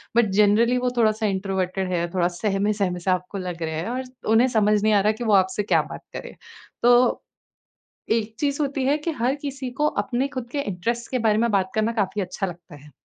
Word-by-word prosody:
But 235 -1 +5
generally 225 +4 +4
वो 250 0 0
थोड़ा-सा 220 -1 +2
introverted 190 -1 -1
हैं, 170 -1 -1
थोड़ा 175 -2 +1
सहमे 195 +3 0
सहमे 185 -4 -1
से 185 +2 0
आपको 185 +2 -2
लग 180 -3 -5
रहे 160 -1 -3
हैं 165 +6 -3
और 255 +2 -2 0.3
उन्हें 235 +3 +5
समझ 210 -3 +2
नहीं 215 0 +3
आ 205 - +5
रहा 205 - +1
है 215 - +4
कि 240 - -6
वो 215 -2 +2
आपसे 190 +1 +3
क्या - - +3
बात - - -7
करें। - - -7 0.5
तो, 245 +1 +4 0.9
एक 225 -1 0
चीज़ 285 0 0
होती 275 -2 -1
है 285 +3 +3
कि 325 +2 -3
हर 260 +3 +2
किसी 275 -3 -4
को 300 - +3 0.2
अपने 255 +3 -1
खुद 240 -2 -5
के 285 - -1
इंटरेस्ट 230 +3 -3
के 255 - 0
बारे 210 - +2
में 235 +1 +2
बात 190 -2 +1
करना 220 +1 +1
काफ़ी 200 +1 -2
अच्छा 185 +2 -3
लगता 170 -2 -10
है। 150 - -16
210 Hz, 225 wpm, -23 LUFS, 190-245 Hz, 0.9 s, But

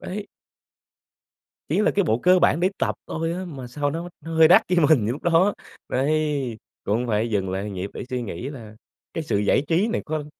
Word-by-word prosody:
đấy. 205 +2 -6 1.4
Ý - - +1
là - - +3
cái 200 -2 +2
bộ 115 -5 +1
cơ 180 +6 +5
bản 175 -2 +3
để 185 - +3
tập - - 0
thôi 165 +1 -2
á 185 +2 -4
mà 140 -8 -8
sao 145 +3 -2
nó 170 +3 -4
nó 165 0 -7
hơi 160 0 +7
đắt 180 - +7
với 180 -1 +2
mình 130 -10 +4
lúc 130 +5 -3
đó. 175 +4 +3 0.3
Đấy, 140 -3 0 0.3
cũng 115 +4 0
phải 110 +1 0
dừng 95 -3 -1
lại 100 +2 -3
nhịp 95 +1 -5
để - - -5
suy 125 -1 -2
nghĩ 115 +4 -5
là 115 -7 -10 0.4
cái 165 - -3
sự 105 -7 0
giải 105 +6 +2
trí 175 +7 +2
này 235 - -2
có 155 -1 -3
145 Hz, 215 wpm, -23 LUFS, 115-170 Hz, 1.4 s, hơi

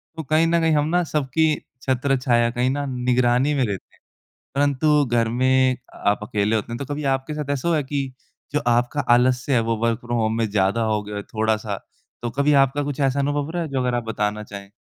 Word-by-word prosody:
तो 160 - -5
कहीं 155 +4 +2
न 170 0 +2
कहीं 160 -1 +3
हम 150 0 +2
ना 180 - +3
सबकी 155 +2 +1 0.3
छत्रछाया 130 -3 +1
कहीं 125 +1 0
ना 145 +1 -1
निगरानी 125 +2 +2
में 140 -2 +1
रहते 100 -4 -6
हैं। - - -32 0.5
परंतु 145 +1 +3
घर 120 -2 +1
में 130 0 +3 0.3
आप 100 0 +3
अकेले 105 +1 0
होते 110 +2 -2
हैं, - - -3
तो 140 - -5
कभी 150 +1 -4
आपके 135 +3 -8
साथ 150 -2 -5
ऐसा 140 +3 -3
हुआ 165 - +3
है 150 - -1
कि, 135 -1 -3 0.4
जो 150 - +2
आपका 120 +4 +2 0.2
आलस्य 125 +2 +1
है 125 - +4
वो - - +2
वर्क 115 -1 +1
फ्रॉम 120 0 -3
होम 110 0 0
में 115 -2 0
ज़्यादा 100 +2 +1
हो 105 - 0
गया 105 0 -5
थोड़ा-सा? 110 -3 -2 0.4
तो 120 - -2
कभी 145 +1 +3
आपका 145 +2 -3
कुछ 145 0 -4
ऐसा 135 0 +1
अनुभव 145 +1 -1
रहा 175 0 -2
है 160 - -6
जो 135 - -1
अगर 125 -1 0
आप 120 - -1
बताना 105 -1 -2
चाहें? 100 -1 -10
130 Hz, 225 wpm, -22 LUFS, 115-145 Hz, 0.5 s, है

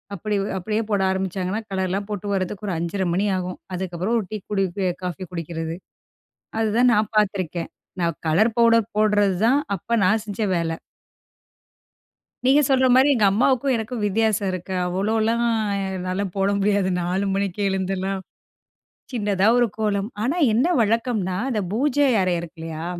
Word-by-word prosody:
அப்படி 210 +3 -2 0.2
அப்படியே 215 +4 -1
போட 205 -2 +1
ஆரம்பிச்சாங்கன்னா, 190 +2 -2
கலர்லாம் 190 +1 -1
போட்டு 205 -1 -4
வரதுக்கு 195 +2 -3
ஒரு 190 - -1
5:30 170 +4 -2
மணி 195 +4 +1
ஆகும். 180 0 -5 0.2
அதுக்கப்புறம் 185 +4 -2
ஒரு 220 - -1
டீ 215 - -3
குடிக்கி 195 -1 0
காஃபி 180 +1 -4
குடிக்கிறது, 165 -1 -4 0.9
அதுதான் 225 +3 +3
நான் 215 +2 0
பாத்துருக்கேன். 185 -5 0 0.3
நான் 170 -1 -1
கலர் 215 +8 +3
பவுடர் 230 -1 +4
போடுறது 205 -3 +3
தான், 270 +5 +4 0.2
அப்ப 180 - -18 0.2
நான் 215 +3 +3
செஞ்ச 205 +1 -4
வேலை. 165 -1 -1 1.7
நீங்க 270 +3 +5
சொல்ற 260 -1 +4
மாரி 260 +2 +6
எங்க 215 -5 +3
அம்மாவுக்கும் 255 +4 +2
எனக்கும் 225 0 -4
வித்தியாசம் 210 -1 +1
இருக்கு. 185 +1 -5
அவ்வளோலாம் 220 +5 0 0.5
என்னால 185 +2 -2
போட 195 0 +2
முடியாது. 200 -1 +2
4 185 +3 -1
மணிக்கே 200 0 -1
எழுந்தலாம். 190 0 -2 0.9
சின்னதா 205 -4 +1
ஒரு 240 - +4
கோலம். 205 -2 0 0.2
ஆனா 275 +8 0 0.2
என்ன 245 +7 +3
வழக்கம்ன்னா, 220 -4 0
அந்த 220 -4 0
பூஜை 280 +4 +2
அறை 185 -1 +1
இருக்குல்லயா. 165 -1 -7
200 Hz, 140 wpm, -23 LUFS, 185-220 Hz, 1.7 s, மாரி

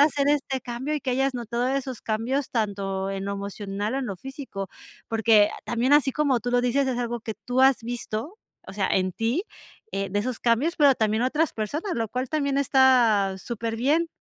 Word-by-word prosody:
hacer 285 -1 +3
este 275 -3 0
cambio 250 +5 -4
y 300 - -2
que 265 - -6
hayas 270 +2 +1
notado 240 +1 -2
esos 265 -2 -3
cambios 240 +6 -1
tanto 195 -4 -2
en 195 0 -3
lo 200 - -2
emocional, 200 +2 -4
en 270 -1 -1
lo 200 -5 -4
físico. 265 -8 -7 0.4
Porque 220 -2 +4 0.2
también 245 +4 +2
así 285 -3 +4
como 285 -4 +2
tú 245 +2 -4
lo 245 0 +3
dices, 260 +3 +1
es 250 -2 -1
algo 240 -1 -2
que 220 -1 -5
tú 245 +5 0
has 265 -3 +5
visto 240 - -4 0.3
o - - -7
sea, 200 -2 0
en 185 0 +1
ti, 230 - -1 0.5
eh, 195 0 -2
de 205 +2 -1
esos 245 +1 -3
cambios, 245 +9 +1
pero 285 -3 +6
también 220 +1 +1
otras 300 +5 +1
personas, 300 - -3
lo 225 -2 -1
cual 255 +3 -3
también 280 -1 0
está 245 -8 +4
súper 230 +2 -4
bien. 295 +8 +2
245 Hz, 200 wpm, -25 LUFS, 215-270 Hz, 0.5 s, pero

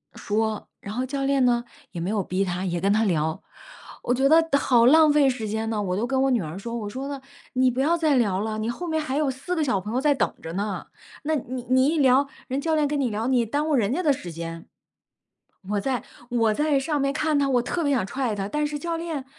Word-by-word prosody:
说， 215 0 -2
然 205 +2 -7
后 255 +1 -1
教 275 +1 -3
练 275 -2 +3
呢， 240 -1 +2 0.3
也 175 - -5
没 180 - -2
有 210 -3 0
逼 185 +3 -1
她， 180 +1 -3
也 175 -2 -1
跟 200 +1 +2
她 220 +1 +2
聊。 160 -5 0 0.6
我 245 - +2
觉 265 +2 +3
得 325 +2 +5
好 240 -4 +4
浪 310 +2 +6
费 285 -2 +5
时 235 -4 -3
间 220 +1 -2
呢， 215 -2 -1
我 185 -2 -1
就 230 - 0
跟 265 +1 0
我 270 - +3
女 235 -5 +2
儿 160 +4 -6
说 230 +3 -5
我 215 -3 -4
说 265 +6 -5
呢， 280 -2 -5 0.3
你 255 0 +3
不 255 - -4
要 330 +5 +3
再 310 -3 +2
聊 200 -6 +1
了， 215 0 -3
你 220 +2 -2
后 350 +9 -4
面 315 -1 0
还 270 -3 -3
有 295 -3 +1
4 275 +8 -4
个 320 - +1
小 245 -9 +1
朋 210 +5 -6
友 255 - +1
在 295 0 +4
等 270 - 0
着 165 - -6
呢， 200 +1 -3 0.4
那 310 +1 0
你 255 -2 -4
你 260 +1 +4
一 320 +1 +1
聊 270 +1 +4 0.2
人 265 +2 -1
教 320 +2 0
练 305 -1 +2
跟 290 0 -1
你 255 -4 +1
聊， 220 +2 -2
你 250 -3 +2
耽 290 +7 -1
误 - - +1
人 230 -1 +1
家 360 +4 -1
的 295 - +4
时 180 -9 -7
间。 165 0 -7 1.0
我 205 -1 0
在 260 -1 -1 0.3
我 225 -3 +2
在 295 -2 +2
上 295 +1 -1
面 275 0 +1
看 305 0 +1
她， 280 -1 +2
我 245 -2 +3
特 335 +7 -2
别 285 -1 +2
想 245 - +1
踹 255 -3 -2
她， 195 -1 -3
但 300 0 0
是 295 0 -3
教 335 0 -3
练 325 -5 -4
255 Hz, 280 characters per minute, -24 LUFS, 215-285 Hz, 1.0 s, 浪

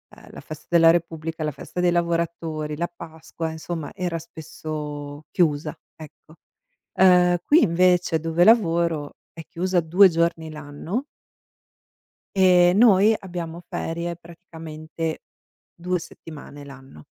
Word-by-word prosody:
uhm, - - -16
la - - -10
festa 155 -1 -11
della 165 -1 +6
Repubblica, 165 -1 -3
la 150 - -1
festa 155 - -8
dei 175 - +3
lavoratori, 165 -3 -2
la 170 +2 -1
Pasqua, 160 -1 -7
insomma 160 -1 -6
era 175 -2 -3
spesso 150 -2 -7
chiusa, 150 -3 0 0.2
ecco. 155 +1 -14 0.6
Uhm, 180 -1 +5
qui 315 +3 +5
invece 180 -1 +2
dove 165 +2 0
lavoro 170 -8 +2 0.2
è 165 - -10
chiusa 185 +1 -1
2 180 +5 +5
giorni 165 -1 -1
l'anno 150 - -5 1.3
ehm, 180 -1 +5
noi 215 -1 +5
abbiamo 175 -3 -7
ferie 170 +1 -4
praticamente 165 -2 -7 0.5
2 180 +1 -2
settimane 150 -3 -11
l'anno 135 - -14
165 Hz, 120 wpm, -23 LUFS, 155-175 Hz, 1.3 s, della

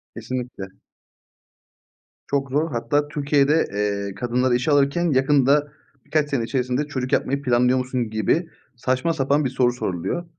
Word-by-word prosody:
Kesinlikle. 125 -6 -5 1.6
Çok 140 -1 -1
zor. 150 +3 0
Hatta 145 +5 0
Türkiye'de, 145 +1 +2
eee, 100 -1 -2
kadınları 125 +1 +1
işe 130 +5 0
alırken 145 +4 +2
yakında, 140 +2 +3 0.3
birkaç 150 -1 0
sene 135 -5 0
içerisinde 125 +3 -1
"Çocuk 130 -3 -4
yapmayı 140 +1 +1
planlıyor 125 -1 +2
musun?" 125 -3 -2
gibi 110 - 0 0.3
saçma 130 +6 0
sapan 140 -1 +1
bir - - +1
soru 125 -1 +2
soruluyor. 125 - -3
130 Hz, 135 wpm, -22 LUFS, 125-145 Hz, 1.6 s, yakında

